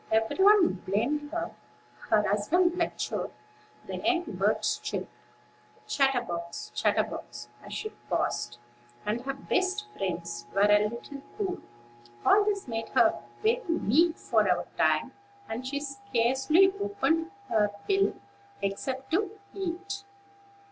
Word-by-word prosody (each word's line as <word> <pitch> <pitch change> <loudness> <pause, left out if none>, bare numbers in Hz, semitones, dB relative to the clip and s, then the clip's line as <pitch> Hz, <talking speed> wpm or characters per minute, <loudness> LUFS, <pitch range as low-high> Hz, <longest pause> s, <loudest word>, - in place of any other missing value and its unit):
Every 225 +11 +2
one 405 - +6
blamed 275 +10 0
her. 340 +1 -3 0.6
Her 210 -1 +4
husband 340 - +2
lectured; 340 -2 -2 0.6
the - - -5
young 355 0 +1
birds - - 0
chirped, - - -4 0.7
"Chatterbox, 240 -12 -1
chatterbox," - - -1
as - - -10
she 430 - -4 0.2
passed; 120 0 -1 0.5
and 215 +3 -1
her 275 +1 -3
best 380 +8 0
friends 170 -11 -3
were 195 - +3
a 210 0 +5
little 275 +5 -8 0.2
cool. 385 -3 -2 0.7
All 415 - +6
this 400 -6 -1
made 225 -2 -3
her - - +4 0.2
very 460 +3 +3
meek 330 +1 +3
for - - +2
a - - +2
time; - - +2 0.4
and 245 +4 -4
she 280 +1 -1
scarcely 270 +6 +2
opened 380 -5 +1 0.2
her 210 -1 +3 0.2
bill, 395 0 +3 0.5
except 260 +7 -3
to 415 +4 0 0.2
eat. 390 +2 -4
280 Hz, 120 wpm, -29 LUFS, -, 0.7 s, one